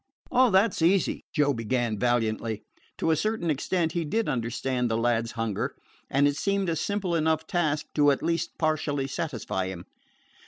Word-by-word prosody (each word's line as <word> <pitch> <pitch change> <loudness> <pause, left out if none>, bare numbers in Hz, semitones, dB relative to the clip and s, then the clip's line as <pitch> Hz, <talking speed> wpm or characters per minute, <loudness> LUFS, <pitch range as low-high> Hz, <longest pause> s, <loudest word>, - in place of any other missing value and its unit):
"Oh, 255 0 +5
that 195 0 +4
's - - -5
easy," 180 +3 +2
Joe 145 -3 +2
began 115 -2 -1
valiantly. 115 -2 0 0.3
To 165 - +1
a - - +4
certain 215 -2 0
extent 165 +3 0
he 170 0 -1
did 220 +9 -1
understand 125 +1 -1
the 110 - +1
lad's 115 0 0
hunger, 115 -3 -2 0.3
and 140 +2 +3
it 145 0 0
seemed 200 +1 0
a 165 - 0
simple 190 +2 -1
enough 160 -1 +1
task 155 -3 0
to 145 -1 +4
at 140 - +1
least 165 0 -1
partially 155 -3 0
satisfy 125 - -3
him. 90 -2 -7
145 Hz, 170 wpm, -27 LUFS, 120-170 Hz, 0.3 s, Oh